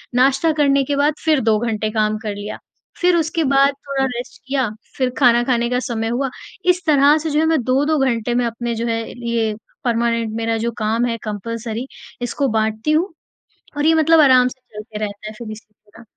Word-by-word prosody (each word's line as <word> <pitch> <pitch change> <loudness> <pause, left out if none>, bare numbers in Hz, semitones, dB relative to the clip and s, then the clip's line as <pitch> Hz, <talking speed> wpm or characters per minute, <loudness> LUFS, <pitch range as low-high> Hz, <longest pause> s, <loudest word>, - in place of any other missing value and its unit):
नाश्ता 270 +5 +3
करने 280 -1 +4
के 285 +2 -1
बाद 290 +2 +2
फिर 310 -3 +4
2 215 - +4
घंटे 220 -2 -1
काम 215 -1 +1
कर 210 -2 -3
लिया। 205 +1 -6 0.4
फिर 360 0 +4
उसके 325 0 0
बाद 275 +1 +5 0.2
थोड़ा 270 -1 0
रेस्ट 245 -1 -6
किया 265 -4 0 0.3
फिर 255 -2 +1
खाना 240 -3 +5
खाने 240 -1 +1
का 250 0 +1
समय 225 -1 -2
हुआ। 260 +3 -1 0.4
इस 360 0 +2
तरह 290 0 +5
से 315 +1 -3
जो 300 0 +1
है 320 - +3
मैं 320 -3 +2
2-2 280 +5 +2
घंटे 240 -3 0
में 245 0 +2
अपने 235 0 -3
जो 230 +1 -2
है 230 0 -1 0.3
ये 225 -2 0 0.3
परमानेंट 230 -2 0
मेरा 225 0 0
जो - - 0
काम 225 +2 0
है 230 -1 -1
कंपल्सरी 225 +3 -4 0.3
इसको 260 +3 -1
बाँटती 220 +6 -1
हूँ। 330 +4 +1 0.6
और 290 - 0
ये 325 - +5
मतलब 320 0 +4
आराम 255 -3 +6
से 255 +1 -8 0.2
चलता 210 0 -7
रहता 205 +1 -8
है 215 - -7
फिर 225 -2 -7
इस 215 0 -8
तरह। 210 +2 -19
245 Hz, 205 wpm, -19 LUFS, 225-280 Hz, 0.6 s, आराम